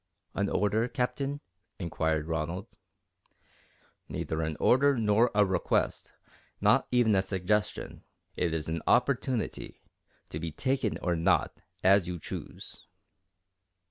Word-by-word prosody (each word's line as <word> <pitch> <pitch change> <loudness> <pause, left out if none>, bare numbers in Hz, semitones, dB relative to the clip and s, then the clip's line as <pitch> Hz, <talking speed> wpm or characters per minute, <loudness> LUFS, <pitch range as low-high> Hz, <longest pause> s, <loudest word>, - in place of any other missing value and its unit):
"An 100 0 0
order, 105 +3 +1
Captain?" 140 +2 -2 0.4
inquired 80 -3 -1
Ronald. 80 +3 -3 1.4
"Neither 80 0 -3
an 80 -1 -2
order 140 +2 +4
nor 110 +2 +3
a 105 -1 +5
request 95 -2 0 0.5
not - - +3
even 120 -3 +3
a 95 - +4
suggestion. 95 +2 -2 0.3
It 85 -2 0
is 80 -1 -2
an 80 0 -2
opportunity, 125 -1 0 0.5
to 75 - -5
be 80 0 -4
taken 130 - -1
or 90 -1 +1
not, 80 0 +2 0.3
as 95 -1 +5
you 90 -1 -3
choose." 80 - -8
100 Hz, 115 wpm, -29 LUFS, 85-120 Hz, 1.4 s, a